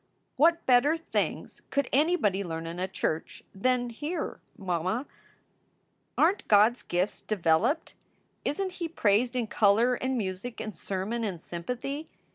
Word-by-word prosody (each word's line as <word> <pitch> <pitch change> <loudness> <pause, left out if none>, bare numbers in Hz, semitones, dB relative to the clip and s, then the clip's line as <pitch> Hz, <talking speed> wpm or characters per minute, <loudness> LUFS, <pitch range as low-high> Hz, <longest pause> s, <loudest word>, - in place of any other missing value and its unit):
"What 335 +3 +4
better 265 +6 +4
things 330 - -3
could 280 -2 0
anybody 270 - +2
learn 165 -2 -4
in 165 +2 -5
a 185 - -1
church 160 -4 -3
than 245 +4 +1
here, 305 +7 -4 0.2
mamma? 185 - -1 1.1
Aren 365 +6 +4
t - - -16
God 210 +2 +6
s 245 - -14
gifts 180 +3 -1
developed? 195 - +1 0.5
Isn 380 +6 -1
t - - -14
he 340 - -2
praised 240 -5 +2
in 245 -2 +1
color 220 +3 +3
and 260 +1 -1
music 200 +3 -4
and 215 -3 -5
sermon 200 +7 -3
and 190 -6 -3
sympathy? 250 - -5
235 Hz, 145 wpm, -28 LUFS, 190-280 Hz, 1.1 s, God